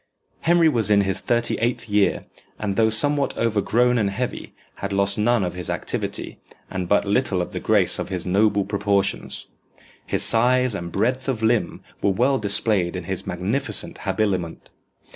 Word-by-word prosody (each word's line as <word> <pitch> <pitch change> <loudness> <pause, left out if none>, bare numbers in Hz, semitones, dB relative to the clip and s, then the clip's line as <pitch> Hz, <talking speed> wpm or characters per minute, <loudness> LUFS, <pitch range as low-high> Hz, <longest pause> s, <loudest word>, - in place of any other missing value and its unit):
Henry 170 0 +3
was 115 -9 +1
in 100 -1 +4
his 95 -1 -1
thirty 120 0 0
eighth 115 0 -1
year, 105 -1 +1 0.3
and 100 -2 -3
though 110 +2 +3
somewhat 140 +6 +3
overgrown 115 +2 +1
and 100 -2 +1
heavy, 125 +5 -5 0.2
had 100 - -5
lost 100 +1 +1
none 115 0 +2
of 90 - -3
his 90 -1 -6
activity, - - -4 0.3
and 90 -2 -4
but 105 - +3
little 100 -1 +1
of 90 - -3
the - - -4
grace - - +3
of - - -4
his 90 -2 -3
noble 100 +2 +2
proportions. 100 -1 -1 0.6
His - - +1
size 125 +1 +4
and 85 -3 -5
breadth 125 +7 -1
of 115 -4 -2
limb 115 0 0 0.2
were - - +2
well 125 +7 +1
displayed 100 -3 +1
in 90 - -5
his 95 +2 -4
magnificent 100 +10 -2
habiliment. 95 -6 -2
105 Hz, 165 wpm, -22 LUFS, 95-120 Hz, 0.6 s, in